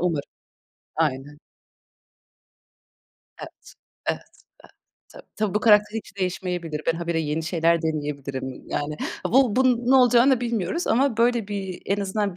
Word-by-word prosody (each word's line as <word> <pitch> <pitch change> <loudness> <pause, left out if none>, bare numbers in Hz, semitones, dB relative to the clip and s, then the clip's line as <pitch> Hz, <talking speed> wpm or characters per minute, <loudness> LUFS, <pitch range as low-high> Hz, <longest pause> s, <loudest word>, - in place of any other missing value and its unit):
Umarım. 165 -5 -1 0.7
Aynen. 145 -1 -2 2.0
Evet, - - -12 0.3
evet, - - -1
evet. - - -19 0.9
Tabii, - - -11
tabii, 210 -2 -1
bu 210 - +2
karakter 210 0 +4
hiç 205 - -13
değişmeyebilir. 180 -4 -3
Ben 165 - +3
habire 170 -1 -1
yeni 155 +1 -2
şeyler 165 0 +1
deneyebilirim. 140 -4 -4
Yani, 150 +1 -3 0.3
bu 250 -2 +3
bunun 250 -2 +2
ne - - +6
olacağını 250 0 +5
bilmiyoruz 235 - -2
ama 260 0 +2
böyle 235 -2 +2
bir, 195 -3 -5
en 200 +1 0
azından, 200 -1 -2
190 Hz, 130 wpm, -24 LUFS, 160-230 Hz, 2.0 s, ne